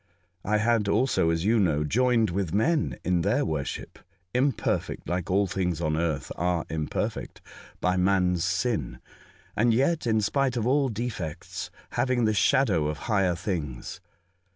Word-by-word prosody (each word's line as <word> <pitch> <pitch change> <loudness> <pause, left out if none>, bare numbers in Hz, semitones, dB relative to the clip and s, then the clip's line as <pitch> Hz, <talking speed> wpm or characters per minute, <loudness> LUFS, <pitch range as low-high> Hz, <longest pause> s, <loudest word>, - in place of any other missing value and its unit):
I 105 +1 +1
had 110 -1 +2
also, 110 -5 +2
as 80 +2 0
you 115 +2 +3
know, 80 -6 +2
joined 115 - +2
with 95 -1 -2
men 155 +9 +1
in 90 -1 +1
their - - +1
worship 75 -4 -4 0.2
— - - -44
imperfect, 130 -1 0
like 90 -1 -2
all 100 +2 +3
things 90 -4 -1
on 75 -2 0
earth 80 -4 -2
are 90 -1 0
imperfect 80 -2 -3 0.4
by 90 0 +1
man's 90 -2 +2
sin 100 - -1 0.3
— - - -29
and 115 +1 +3
yet, 140 +2 +1
in 110 -1 +3
spite 130 +4 0
of 115 - -1
all 135 +1 +2
defects, 105 -8 -5 0.2
having 120 -1 +1
the 110 - +2
shadow 100 - +3
of 75 0 -3
higher 95 -4 +2
things. 85 - -4
100 Hz, 155 wpm, -27 LUFS, 85-120 Hz, 0.4 s, you